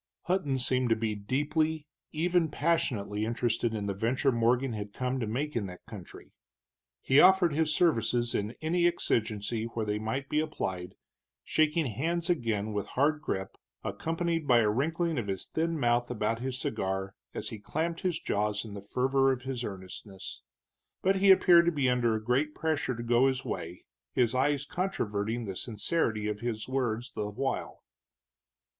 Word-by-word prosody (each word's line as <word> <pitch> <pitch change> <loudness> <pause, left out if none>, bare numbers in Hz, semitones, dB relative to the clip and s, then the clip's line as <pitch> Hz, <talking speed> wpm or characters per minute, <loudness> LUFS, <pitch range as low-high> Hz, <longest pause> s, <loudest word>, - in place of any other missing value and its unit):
Hutton 170 -7 0
seemed 130 -1 +1
to 115 - +4
be 110 -1 -1
deeply, 150 +8 -1 0.3
even 170 +1 +1
passionately, 120 -10 0
interested 115 0 0
in 105 -2 -3
the 100 - -1
venture 120 +7 +1
Morgan 120 +2 +2
had 105 -1 -5
come 125 +1 -2
to 115 - -2
make 140 +7 -2
in 105 -4 -1
that 90 -1 -11
country. - - -11 0.7
He 135 +2 +5
offered 185 -2 +6
his 155 +1 +1
services 120 -7 +2
in 105 +3 -2
any 170 +2 +3
exigency 110 -8 0
where 115 -1 -3
they 105 0 -1
might 115 +6 -3
be 150 - +1
applied, 95 - -3 0.5
shaking 155 +1 +2
hands 165 - -1
again 110 -9 -1
with 105 -1 -2
hard 150 +3 +1
grip, 95 -10 -3 0.3
accompanied 165 -1 -2
by 120 -2 +6
a 105 -1 +3
wrinkling 160 +5 0
of 110 - -4
his 95 -2 -3
thin 165 0 -1
mouth 120 -1 +2
about 115 -1 -1
his 130 +1 -3
cigar 95 -4 -2 0.2
as - - -3
he 110 - -7
clamped 165 +9 -2
his 180 -4 0
jaws 105 -2 -1
in 105 - -8
the 100 - -7
fervor 135 +5 +2
of 125 -2 -3
his 130 -2 -3
earnestness. 95 -1 -7 0.6
But 195 +1 +3
he 195 +1 +4
appeared 175 -2 +7
to - - +5
be 145 -5 +1
under 120 -2 +2
a 110 - -4
great 135 +6 +1
pressure 155 -5 -1
to 120 - -5
go 120 +2 +4
his 130 -1 -1
way, 85 +2 -5 0.3
his 120 -2 +2
eyes 140 +2 +1
controverting 115 - -2
the 95 -2 -5
sincerity 110 - -1
of 105 -1 -2
his 115 -2 -3
words 125 -2 -1
the 105 -1 -3
while. 135 +6 -3
125 Hz, 170 wpm, -30 LUFS, 110-155 Hz, 0.7 s, appeared